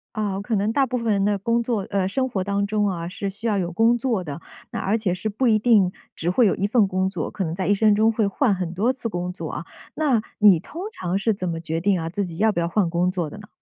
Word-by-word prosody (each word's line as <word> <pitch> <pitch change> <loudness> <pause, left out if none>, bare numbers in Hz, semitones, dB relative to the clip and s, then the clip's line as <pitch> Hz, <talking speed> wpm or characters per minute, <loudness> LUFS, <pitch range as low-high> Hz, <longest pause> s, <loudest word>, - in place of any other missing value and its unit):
啊， 200 -2 -2
可 220 +2 -1
能 205 +2 +1
大 275 - +3
部 255 0 -2
分 230 -2 0
人 200 -1 +1
的 205 0 +2
工 230 +4 0
作 225 -5 -2
呃， 195 -2 0
生 260 +6 0
活 195 -7 -2
当 200 +1 0
中 210 0 +1
啊， 170 -3 -3
是 195 +2 -4
需 200 +4 -5
要 210 -3 +1
有 175 -2 -1
工 225 +6 +3
作 230 -6 -1
的， 150 +1 -6 0.3
那 - - -3
而 210 +4 +1
且 205 -5 0
是 200 +4 -3
不 230 +5 0
一 220 -2 +5
定 215 -5 +4 0.2
只 170 - -1
会 210 +7 +4
有 200 - +3
1 200 - 0
份 220 0 +4
工 190 0 0
作， 195 - -4
可 195 - -3
能 160 0 -3
在 190 +1 -2
一 205 - +4
生 210 +1 +4
中 220 +2 +4
会 220 -2 +1
换 215 +3 +1
很 180 -3 -3
多 210 +8 +2
次 255 -3 -4
工 180 -4 -3
作 180 - -6
啊， - - -5 0.3
那 275 -8 +2 0.2
你 205 -6 +7
通 325 - -8
常 180 - -2
是 215 +3 +1
怎 185 -2 -4
么 165 -1 -3
决 165 0 -2
定 195 +2 +2
啊， 165 0 -3
自 200 +4 -2
己 170 -2 -8
要 220 +3 +3
不 190 - -2
要 170 - 0
换 180 0 +1
工 175 +2 +1
作 175 -4 -2
的 - - -10
呢？ 210 0 -12
200 Hz, 310 characters per minute, -23 LUFS, 180-225 Hz, 0.3 s, 你